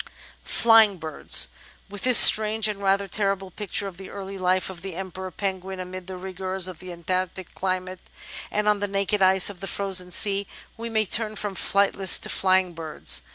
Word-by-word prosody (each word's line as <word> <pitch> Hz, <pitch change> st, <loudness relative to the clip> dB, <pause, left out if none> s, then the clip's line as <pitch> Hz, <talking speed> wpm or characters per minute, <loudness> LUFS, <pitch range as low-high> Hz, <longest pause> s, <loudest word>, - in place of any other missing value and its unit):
§8 -, -, -19 dB, 0.4 s
Flying 225 Hz, -4 st, +5 dB
Birds 155 Hz, -, +1 dB, 0.4 s
With 200 Hz, 0 st, -10 dB
this 250 Hz, -3 st, +5 dB
strange 215 Hz, 0 st, +7 dB
and 205 Hz, -2 st, -5 dB
rather 195 Hz, 0 st, 0 dB
terrible 195 Hz, -1 st, -2 dB
picture 205 Hz, +1 st, -3 dB
of 185 Hz, -3 st, -10 dB
the 190 Hz, 0 st, -11 dB
early 195 Hz, -1 st, -8 dB
life 185 Hz, 0 st, -1 dB
of 175 Hz, -2 st, -11 dB
the 190 Hz, -2 st, -8 dB
Emperor 185 Hz, 0 st, -7 dB
Penguin 190 Hz, 0 st, -5 dB
amid 185 Hz, 0 st, -9 dB
the 190 Hz, -1 st, -8 dB
rigours 185 Hz, 0 st, -3 dB
of 180 Hz, -3 st, -9 dB
the 185 Hz, -1 st, -10 dB
Antarctic 185 Hz, +1 st, -5 dB
climate 185 Hz, -1 st, -4 dB, 0.5 s
and 210 Hz, 0 st, -2 dB
on 210 Hz, -1 st, +2 dB
the 205 Hz, -, -3 dB
naked 195 Hz, +1 st, -2 dB
ice 190 Hz, +1 st, +4 dB
of 190 Hz, -, -14 dB
the 195 Hz, -, -7 dB
frozen 190 Hz, -3 st, -2 dB
sea, 200 Hz, +1 st, +3 dB, 0.3 s
we 230 Hz, +1 st, -7 dB
may 220 Hz, -1 st, 0 dB
turn 215 Hz, +1 st, -1 dB
from 205 Hz, -1 st, -6 dB
flightless 195 Hz, -1 st, +2 dB
to -, -, -5 dB
flying 185 Hz, -1 st, +1 dB
birds. 150 Hz, -, -3 dB
190 Hz, 190 wpm, -23 LUFS, 185-200 Hz, 0.5 s, strange